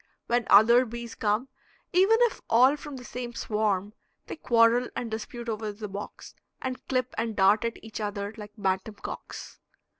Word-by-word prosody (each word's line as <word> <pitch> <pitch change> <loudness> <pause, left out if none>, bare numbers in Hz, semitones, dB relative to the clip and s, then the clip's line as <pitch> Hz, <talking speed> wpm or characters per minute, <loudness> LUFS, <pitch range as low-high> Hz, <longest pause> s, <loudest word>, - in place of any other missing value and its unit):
When 240 0 0
other 235 +5 +7
bees 235 -1 -7
come, 215 +4 0 0.5
even 385 +5 +5
if 480 -2 +2
all 255 +5 +6
from 295 -1 -9
the 250 - -9
same 240 +1 -6
swarm, 210 -2 -1 0.3
they - - -6
quarrel 240 -3 +3
and 230 -2 -4
dispute 235 +2 -6
over 215 -1 -3
the 210 +1 -7
box, 200 +1 -8 0.3
and 255 -1 -5
clip 255 -1 -1
and 225 -1 -2
dart 200 +3 +4
at 230 - -3
each 220 0 -7
other 205 0 -3
like 210 -2 -10
bantam 195 +1 -1
cocks. 195 - -8
225 Hz, 170 wpm, -27 LUFS, 210-245 Hz, 0.5 s, other